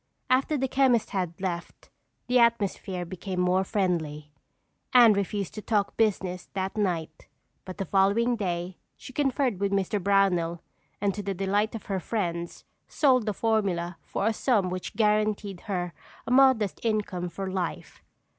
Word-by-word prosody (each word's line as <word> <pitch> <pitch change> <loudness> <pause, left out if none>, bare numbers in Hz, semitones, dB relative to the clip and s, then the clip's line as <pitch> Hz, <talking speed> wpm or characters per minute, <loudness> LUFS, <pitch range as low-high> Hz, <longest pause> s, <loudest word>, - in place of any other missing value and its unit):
After 270 +4 +3
the 265 0 0
chemist 260 -4 +2
had 180 -4 -3
left, 175 -3 -5 0.3
the 250 0 +3
atmosphere 200 -6 +1
became 185 +1 -5
more 180 +1 +2
friendly. 165 -7 -2 0.6
Anne 235 -3 +8
refused 200 0 -2
to 215 - -6
talk 205 -2 0
business 190 -5 0
that 190 +1 -3
night 170 -7 -2 0.4
but 185 0 -8
the 195 - -2
following 200 +6 +2
day 180 -3 -3 0.2
she 260 - -11
conferred 270 -6 0
with 200 0 0
Mr. 200 +1 0
Brownell 180 -4 +2 0.4
and 200 -1 +1
to 205 - -4
the 195 -1 -3
delight 205 +4 0
of 220 - -7
her 195 -2 -2
friends 170 -4 -3 0.2
sold 255 -6 +3
the - - +2
formula 190 -6 0
for 195 - -3
a 220 - +2
sum 210 -6 +1
which 185 +1 -5
guaranteed 210 -2 +1
her 180 -3 -2 0.3
a - - -4
modest 255 -6 +4
income 205 -6 -1
for 190 +2 -5
life. 185 -3 -4
195 Hz, 155 wpm, -27 LUFS, 180-220 Hz, 0.6 s, Anne